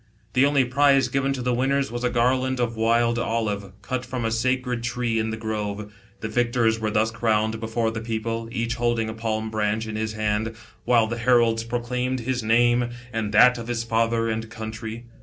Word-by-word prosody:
The 135 +2 +5
only 140 -2 +3
prize 135 +1 +3
given 135 0 0
to 130 -2 -4
the 125 0 +1
winners 135 +1 +1
was 120 +1 -4
a 125 - +2
garland 130 +2 +1
of 120 -1 0
wild 115 +1 +2
olive, 105 -4 -2
cut 130 -1 -3
from 125 -2 -4
a 115 - 0
sacred 125 +1 0
tree 120 -1 -1
in 110 0 -1
the 110 - -3
grove. 105 -2 -4 0.3
The 110 - -2
victors 115 0 +1
were 110 -1 -1
thus 110 +1 +1
crowned 110 -1 0
before 115 0 -1
the 110 0 -5
people, 115 0 -3
each 115 -1 -1
holding 120 -2 0
a - - -4
palm 110 -1 -3
branch 110 0 0
in 110 -1 -5
his 110 0 -2
hand, 110 +1 -1 0.3
while 120 -2 +4
the 115 +2 -4
heralds 115 -2 +3
proclaimed 125 +2 -2
his 125 +1 -1
name 120 +2 +3 0.2
and 110 -2 -2
that 125 +3 +6
of 115 - -7
his 120 -1 -1
father 115 0 +1
and 110 0 -3
country. 110 +1 -6
115 Hz, 195 wpm, -24 LUFS, 110-125 Hz, 0.3 s, that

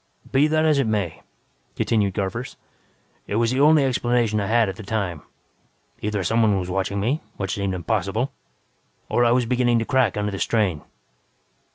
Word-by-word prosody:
"Be 140 +3 +4
that 155 0 +2
as 155 -3 +3
it 135 - +1
may," 100 -7 -2 0.5
continued 100 -4 0
Garvers, 115 +7 -3 0.7
"it 100 - -3
was 115 +1 +2
the 130 - 0
only 150 0 +5
explanation 120 -4 +1
I 100 - -2
had 115 0 +3
at 95 - -4
the 110 - -9
time. 100 -6 -3 0.8
Either 105 -2 -2
someone 110 +1 +2
was 90 0 -4
watching 95 +1 -1
me, 125 +10 0 0.2
which 95 -1 -2
seemed 100 -2 -2
impossible, 105 +6 -1 0.8
or 120 - +2
I 120 - +4
was 125 0 +2
beginning 120 0 +2
to 115 - 0
crack 130 -3 +1
under 105 0 -1
the 100 - -5
strain. 100 -9 0
110 Hz, 175 wpm, -23 LUFS, 100-125 Hz, 0.8 s, only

